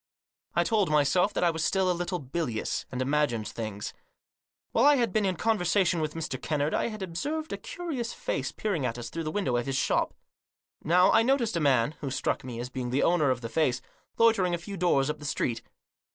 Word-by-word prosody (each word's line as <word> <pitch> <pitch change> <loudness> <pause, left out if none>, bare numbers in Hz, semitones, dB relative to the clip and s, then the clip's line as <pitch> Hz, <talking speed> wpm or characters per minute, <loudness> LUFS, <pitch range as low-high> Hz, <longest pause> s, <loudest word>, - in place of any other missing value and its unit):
I - - +4
told 210 -6 +1
my 150 -1 +4
self 180 +8 +2
that - - +1
I 170 - +4
was 160 -1 -3
still 190 0 +2
a - - +2
little 175 +1 -2
bilious, 135 -5 -3
and 130 0 -1
imagined 135 -6 0
things. 110 -3 -5 0.8
While 230 - +3
I 290 0 +7
had 235 -7 +1
been 215 -2 +2
in 190 -1 +1
conversation 185 -4 +2
with 155 0 -3
Mr. 155 -5 -4
Kennard 150 -1 -1
I - - +1
had 215 -3 -5
observed 295 - -3
a - - -3
curious 290 -10 -4
face 140 +1 -3
peering 195 -9 -2
at 120 -2 -2
us 120 -1 -6
through 165 -1 -4
the 155 - -2
window 155 -11 0
of 120 - -2
his 135 - -1
shop. - - +1 0.7
Now 180 +4 +5
I - - +5
noticed 235 -3 +1
a - - +1
man, 135 -4 +3
who 140 - -4
struck - - -1
me 125 -2 -6
as 125 +1 -5
being 125 -1 -3
the 130 +3 +1
owner 165 -5 +3
of 125 -1 0
the 115 - -4
face, 130 -4 +1 0.4
loitering 200 -6 +4
a - - -3
few 200 +4 -8
doors 165 -7 +2
up 150 - -3
the - - -11
street. 120 -4 -1
165 Hz, 225 wpm, -28 LUFS, 130-195 Hz, 0.8 s, I